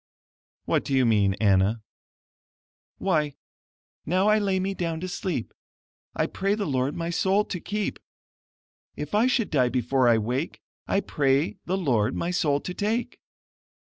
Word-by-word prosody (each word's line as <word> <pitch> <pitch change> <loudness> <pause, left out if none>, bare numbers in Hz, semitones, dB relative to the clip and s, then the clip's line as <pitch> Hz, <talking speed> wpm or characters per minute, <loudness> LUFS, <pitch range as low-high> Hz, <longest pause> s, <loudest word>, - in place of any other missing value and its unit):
"What - - +1
do 135 - -1
you 130 -1 +4
mean, 100 -4 +3
Anna?" 100 +1 +2 1.1
"Why, 155 -7 0 0.7
'Now 185 +6 +2
I 215 0 +4
lay 195 -2 +1
me 195 +1 -1
down 165 -3 -3
to 185 - -3
sleep, 180 - -3 0.6
I - - +1
pray 195 +2 -1
the 210 -2 -2
Lord 135 -1 0
my 170 0 -3
soul 195 +4 +2
to 180 - -4
keep! 210 +3 -3 1.0
If 150 0 -6
I 215 +4 +4
should 245 -4 +1
die 130 -5 +3
before 125 +1 +1
I 115 - +5
wake, 125 +8 -2 0.3
I 195 - +1
pray 140 +4 +1
the 185 +2 0
Lord 120 - +1
my 170 - -1
soul 150 -5 +1
to 180 - -5
take.' 220 +5 -2
160 Hz, 155 wpm, -26 LUFS, 130-195 Hz, 1.1 s, I